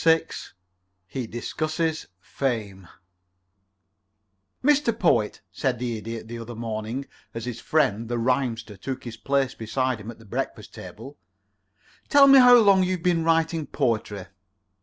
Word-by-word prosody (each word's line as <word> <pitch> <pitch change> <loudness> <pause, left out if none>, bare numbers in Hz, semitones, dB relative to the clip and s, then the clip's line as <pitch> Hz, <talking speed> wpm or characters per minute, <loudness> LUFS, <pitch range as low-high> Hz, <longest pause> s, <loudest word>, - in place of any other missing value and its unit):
VI 165 0 +4 0.8
HE 125 +4 -5
DISCUSSES 155 +7 -2
FAME 100 -5 -3 1.8
"Mr. 275 -5 +3
Poet," 120 - +1
said 125 +5 -1
the 120 -1 -3
Idiot, 115 0 -7
the 115 +1 -7
other 115 +1 -8
morning 115 +3 -4 0.3
as 115 0 -4
his 125 -1 -5
friend, 115 -7 +1
the 120 - -1
Rhymster, 115 -3 -1
took 130 +7 -5
his 120 -2 -8
place 135 -2 0
beside 130 +2 -2
him 105 - -8
at 115 - -9
the 115 - -17
breakfast 100 - -5
table, 135 +7 -10 0.9
"tell 285 -1 +7
me: 275 -1 +8
How 250 -1 +9
long 200 -4 +5
have 185 - +2
you 185 0 0
been 175 -1 +1
writing 165 -1 +1
poetry?" 105 -7 -1
125 Hz, 140 wpm, -25 LUFS, 115-165 Hz, 1.8 s, How